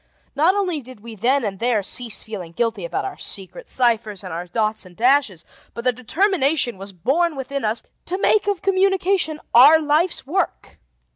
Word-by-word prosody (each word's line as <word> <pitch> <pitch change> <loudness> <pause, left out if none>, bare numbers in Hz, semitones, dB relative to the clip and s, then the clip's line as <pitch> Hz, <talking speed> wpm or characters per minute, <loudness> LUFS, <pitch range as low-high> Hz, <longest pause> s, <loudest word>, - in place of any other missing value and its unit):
Not 325 +7 +3
only 365 -7 -1
did 255 -4 -13
we 230 +1 -9
then 245 +5 +1
and 195 -2 -4
there 230 -3 +1
cease 230 +2 -2
feeling 185 -6 -8
guilty 225 -2 -1
about - - -3
our 390 -1 -6
secret 205 - -4
ciphers 225 -5 0
and 185 -3 -7
our 175 +2 -5
dots 215 +3 -1
and 180 -2 -16
dashes, 245 - +2 0.3
but 235 - -6
the 250 - +3
determination 275 - 0
was 195 +1 -7
born 285 - 0
within 275 +1 -4
us 220 +1 0 0.2
to 365 - -2
make 415 +1 +2
of 405 -4 -1
communication 380 -4 +1
our 285 +7 +8
life's 310 +3 +1
work. 355 +6 -3
255 Hz, 175 wpm, -21 LUFS, 215-335 Hz, 0.3 s, our